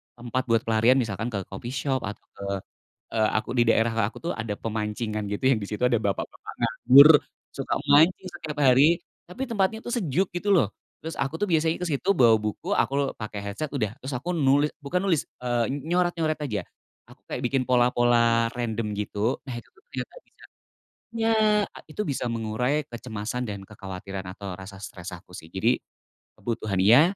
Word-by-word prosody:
tempat 120 Hz, +2 st, -2 dB
buat 115 Hz, -1 st, +2 dB
pelarian 115 Hz, +3 st, +4 dB
misalkan 115 Hz, -3 st, -1 dB
ke 100 Hz, -5 st, -3 dB
coffee 120 Hz, +8 st, -7 dB
shop 135 Hz, -1 st, 0 dB
atau 105 Hz, -, -7 dB
ke, 100 Hz, -, -9 dB, 0.7 s
eee, 110 Hz, -1 st, +3 dB
aku -, -, -5 dB
di 120 Hz, -, +4 dB
daerah 115 Hz, 0 st, +3 dB, 0.2 s
aku -, -, -11 dB
tuh 170 Hz, -, -3 dB
ada 110 Hz, -2 st, -4 dB
pemancingan 105 Hz, -1 st, -3 dB
gitu 105 Hz, +5 st, -3 dB
yang 120 Hz, -6 st, +3 dB
disitu 105 Hz, +4 st, -1 dB
ada 125 Hz, -1 st, +3 dB
bapak-bapak 100 Hz, -3 st, -3 dB
nganggur, 145 Hz, +3 st, +7 dB, 0.3 s
suka 135 Hz, -, -2 dB
mancing 160 Hz, +6 st, +5 dB
setiap 150 Hz, -1 st, -6 dB
hari, 145 Hz, +4 st, +5 dB, 0.3 s
tapi 265 Hz, +9 st, -4 dB
tempatnya 220 Hz, -2 st, 0 dB
tuh 240 Hz, -, -1 dB
sejuk 185 Hz, -, 0 dB
gitu 200 Hz, +4 st, -1 dB
loh, 160 Hz, -, +3 dB, 0.3 s
terus 160 Hz, 0 st, -6 dB
aku 145 Hz, +4 st, -2 dB
tuh 205 Hz, -, 0 dB
biasanya 160 Hz, -1 st, +2 dB
kesitu 180 Hz, +2 st, 0 dB
bawa 120 Hz, -, +6 dB
buku 110 Hz, -, -2 dB
aku 140 Hz, 0 st, +1 dB
pakai 105 Hz, -2 st, -6 dB
headset 155 Hz, +2 st, -4 dB
udah 110 Hz, -7 st, -1 dB
terus 130 Hz, -, -5 dB
aku 180 Hz, +6 st, -3 dB
nulis 145 Hz, 0 st, +3 dB
bukan 170 Hz, +6 st, 0 dB
nulis, 165 Hz, -7 st, +2 dB, 0.2 s
eee, 120 Hz, -1 st, 0 dB
nyoret-nyoret 165 Hz, +2 st, 0 dB
aja, 110 Hz, -7 st, -3 dB, 0.4 s
aku -, -, -18 dB
kayak 125 Hz, -, -3 dB
bikin 135 Hz, +1 st, +1 dB
pola-pola 120 Hz, -2 st, +3 dB
random 115 Hz, -3 st, -2 dB
gitu 105 Hz, +3 st, -1 dB
nah 130 Hz, -, -5 dB
itu 120 Hz, -, -9 dB
ternyata 435 Hz, +3 st, -8 dB
bisa, -, -, -21 dB, 0.7 s
ya 225 Hz, 0 st, +2 dB, 0.5 s
itu 155 Hz, -, -8 dB
bisa 135 Hz, -3 st, -2 dB
mengurai 115 Hz, +6 st, 0 dB
kecemasan 120 Hz, 0 st, -4 dB
dan 100 Hz, -4 st, -5 dB
kekhawatiran 95 Hz, -2 st, -7 dB
atau 100 Hz, -3 st, -7 dB
rasa 95 Hz, +1 st, -10 dB
stres 95 Hz, -1 st, -8 dB
aku 90 Hz, 0 st, -11 dB
sih 80 Hz, +1 st, -12 dB
jadi, 115 Hz, +6 st, +2 dB, 0.6 s
kebutuhan 110 Hz, -5 st, -2 dB
iya, 115 Hz, +9 st, +7 dB
120 Hz, 170 wpm, -26 LUFS, 110-150 Hz, 0.7 s, nganggur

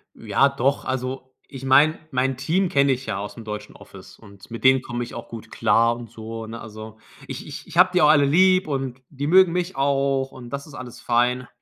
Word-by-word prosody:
Ja -, -, +2 dB
doch, 135 Hz, +3 st, -1 dB
also, 130 Hz, 0 st, -4 dB
ich 135 Hz, -2 st, -10 dB
meine, 145 Hz, +4 st, +4 dB
mein 130 Hz, 0 st, 0 dB
Team 175 Hz, +8 st, 0 dB
kenne 140 Hz, -2 st, +3 dB
ich 130 Hz, +1 st, -2 dB
ja 105 Hz, -3 st, -3 dB
ausm 105 Hz, +3 st, -7 dB
deutschen 105 Hz, -1 st, -7 dB
Office -, -, -14 dB
und 100 Hz, -2 st, -16 dB
mit 115 Hz, -, -7 dB
denen 130 Hz, 0 st, +5 dB
komme 120 Hz, -1 st, -4 dB
ich -, -, -9 dB
auch 120 Hz, 0 st, -8 dB
gut 115 Hz, -2 st, -9 dB
klar 115 Hz, +1 st, +2 dB
und 120 Hz, -1 st, -10 dB
so, 115 Hz, 0 st, -7 dB
ne? 115 Hz, +1 st, -7 dB
Also, 110 Hz, 0 st, -10 dB, 0.3 s
ich -, -, -7 dB
ich -, -, -9 dB
ich -, -, -8 dB
habe 185 Hz, +1 st, +6 dB
die 180 Hz, -, +3 dB
auch 150 Hz, -, +6 dB
alle 145 Hz, -2 st, +5 dB
lieb 185 Hz, +4 st, +4 dB
und 135 Hz, -2 st, -4 dB
die 145 Hz, 0 st, -4 dB
mögen 185 Hz, +1 st, +6 dB
mich 180 Hz, 0 st, -2 dB
auch 135 Hz, -1 st, 0 dB
und 125 Hz, -2 st, -11 dB
das 140 Hz, +4 st, -6 dB
ist 145 Hz, -, -14 dB
alles 125 Hz, -4 st, -9 dB
fein. 125 Hz, +1 st, +1 dB
130 Hz, 220 wpm, -23 LUFS, 115-140 Hz, 0.3 s, habe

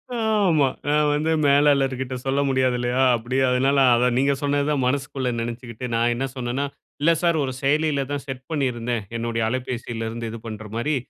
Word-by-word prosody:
ஆமா. 205 Hz, -, +2 dB, 0.2 s
நான் 150 Hz, 0 st, +3 dB
வந்து 155 Hz, +2 st, 0 dB
மேலாளர் 140 Hz, -1 st, +4 dB
கிட்ட 130 Hz, 0 st, -4 dB
சொல்ல 135 Hz, +1 st, +1 dB
முடியாது 130 Hz, -1 st, +2 dB
இல்லையா? 125 Hz, +2 st, 0 dB
அப்படி 120 Hz, +3 st, -3 dB
அதனால 135 Hz, +3 st, +2 dB, 0.2 s
அதான் 120 Hz, +1 st, +2 dB
நீங்க 140 Hz, +1 st, +3 dB
சொன்னதுதான் 145 Hz, -1 st, 0 dB
மனசுக்குள்ள 135 Hz, -1 st, -1 dB
நெனச்சுக்கிட்டு 120 Hz, +1 st, -5 dB
நான் 120 Hz, +1 st, +2 dB
என்ன 135 Hz, -, -2 dB
சொன்னேன்னா, 130 Hz, +2 st, -2 dB, 0.4 s
"இல்லை 165 Hz, +3 st, +5 dB
சார் 170 Hz, -2 st, +2 dB
ஒரு 130 Hz, -, -2 dB
செயலியில 145 Hz, 0 st, +1 dB
தான் 145 Hz, -1 st, -3 dB
செட் 130 Hz, -1 st, -6 dB
பண்ணியிருந்தேன். 120 Hz, -6 st, -1 dB
என்னுடைய 115 Hz, 0 st, -2 dB
அலைபேசியில 120 Hz, -2 st, -3 dB
இருந்து 115 Hz, 0 st, -5 dB
இது 115 Hz, -, -7 dB
பண்ற 110 Hz, -1 st, -7 dB
மாரி, 145 Hz, +6 st, 0 dB
130 Hz, 170 wpm, -23 LUFS, 120-145 Hz, 0.4 s, இல்லை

